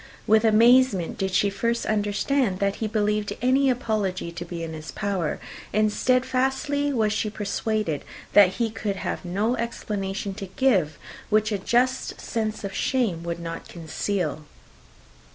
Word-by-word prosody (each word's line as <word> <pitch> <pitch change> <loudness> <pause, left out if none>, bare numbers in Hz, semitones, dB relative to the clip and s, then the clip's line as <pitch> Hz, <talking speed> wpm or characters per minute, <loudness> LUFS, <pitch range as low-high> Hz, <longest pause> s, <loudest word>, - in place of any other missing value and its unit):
With 220 0 +4
amazement 230 -3 +4
did 195 - 0
she 200 +2 +2
first 235 +3 -1
understand 210 +1 +1
that 200 0 0
he 220 - -2
believed 210 -1 0
any 265 +2 +3
apology 210 -8 -1
to 170 +1 -6
be 170 -1 -6
in 160 -1 -5
his 155 0 -8
power; 195 -6 -2 0.3
and 215 0 +2
steadfastly 265 +4 +1
was 220 -5 +1
she 215 - -1
persuaded, 210 -5 -2 0.3
that 195 -2 +7
he 230 +1 -1
could 205 -1 -3
have 195 - -4
no 200 +7 0
explanation 200 -4 -3
to 195 0 -7
give, 190 - +2 0.3
which 215 +1 +2
a 205 - 0
just 250 +6 +1
sense 215 -2 -3
of 195 -1 -4
shame 225 -11 0
would 170 0 -4
not 165 -1 -6
conceal. 165 -1 -3
210 Hz, 150 wpm, -25 LUFS, 190-235 Hz, 0.3 s, that